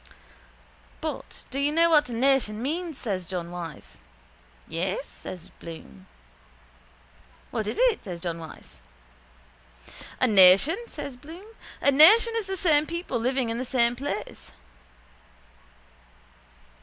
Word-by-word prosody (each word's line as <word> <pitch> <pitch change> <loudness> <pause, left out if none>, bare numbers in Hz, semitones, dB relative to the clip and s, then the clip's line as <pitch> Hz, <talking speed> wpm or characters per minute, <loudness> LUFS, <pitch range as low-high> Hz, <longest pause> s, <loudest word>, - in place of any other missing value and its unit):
—But - - -6
do 270 - -3
you 285 +1 +1
know 335 +2 +3
what 295 -4 +4
a - - -5
nation 245 -3 +1
means? 320 +4 -3
says 190 -9 -3
John 175 -2 -5
Wyse. 165 - -8 0.7
—Yes, 185 - -3
says 180 -3 -10
Bloom. 160 - -11 1.4
—What 215 - -2
is - - -3
it? - - +2
says 180 -5 -6
John 170 -1 -4
Wyse. 160 - -12 1.4
—A - - +3
nation? 200 - +6
says 280 - -7
Bloom. 325 +9 -12 0.4
A 280 - +4
nation 415 - +7
is 445 -4 -2
the 385 0 -3
same 310 -4 +3
people 335 -7 -3
living 255 0 0
in 230 +1 -3
the - - -2
same 240 -2 +1
place. 240 - -6
250 Hz, 125 wpm, -26 LUFS, 185-310 Hz, 1.4 s, nation